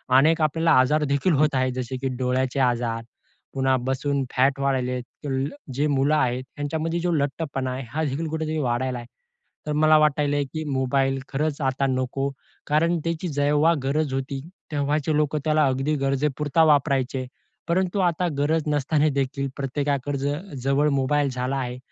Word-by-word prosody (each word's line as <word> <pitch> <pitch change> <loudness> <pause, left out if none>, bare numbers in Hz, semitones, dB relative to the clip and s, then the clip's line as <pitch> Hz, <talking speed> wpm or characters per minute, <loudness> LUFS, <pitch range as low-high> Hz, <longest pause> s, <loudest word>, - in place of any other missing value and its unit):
अनेक 160 +5 +5
आपल्याला 160 +2 +2
आजार 150 +4 +3
देखील 140 +5 +1
होत 150 0 +2
आहेत, 130 0 +1
जसे 130 0 -4
की 135 +1 -3
डोळ्यांचे 130 +1 0
आजार, 120 -3 0 0.5
पुन्हा 135 -1 +2
बसून 140 +1 0
फॅट 135 +2 +3
वाढायलेत. 125 -2 0 0.2
तुल्ल 135 -1 -1 0.3
जे 145 +3 +1
मुलं 145 +1 +2
आहेत, 130 -3 +1
यांच्यामध्ये 160 +3 -2
जो 175 +1 0
लठ्ठपणा 140 -3 -1
आहे, 130 +1 -4
हा 155 +6 -2
देखील 150 +3 -2
कुठेतरी 160 0 -2
वाढत 130 -1 -1
आहे. 120 -1 -6 0.6
तर 150 - 0
मला 155 +1 +5
वाटायल 150 -1 +2 0.2
की 155 -1 -3
मोबाईल 135 0 +1
खरंच 150 +1 -1
आता 135 +1 +1
नको, 130 +1 -1 0.4
कारण 165 +3 +2
त्याची 165 +1 -2
जेव्हा 145 +2 +3
गरज 140 +1 0
होती, 135 +1 -3 0.3
तेव्हाचे 150 +1 0
लोक 150 0 +1
त्याला 155 -1 +3
अगदी 135 +3 0
गरजेपुरता 145 +3 +1
वापरायचे. 140 -4 +2 0.4
परंतु 185 +3 +1
आता 180 -1 +1
गरज 155 +3 +1
नसताना 150 +1 +2
देखील 140 0 -1
प्रत्येकाकडे 140 0 -1
ज 140 +1 -1 0.3
जवळ 140 +2 +2
मोबाईल 140 +1 +1
झाला 125 +2 -2
आहे. 125 -2 -3
140 Hz, 155 wpm, -24 LUFS, 130-155 Hz, 0.6 s, अनेक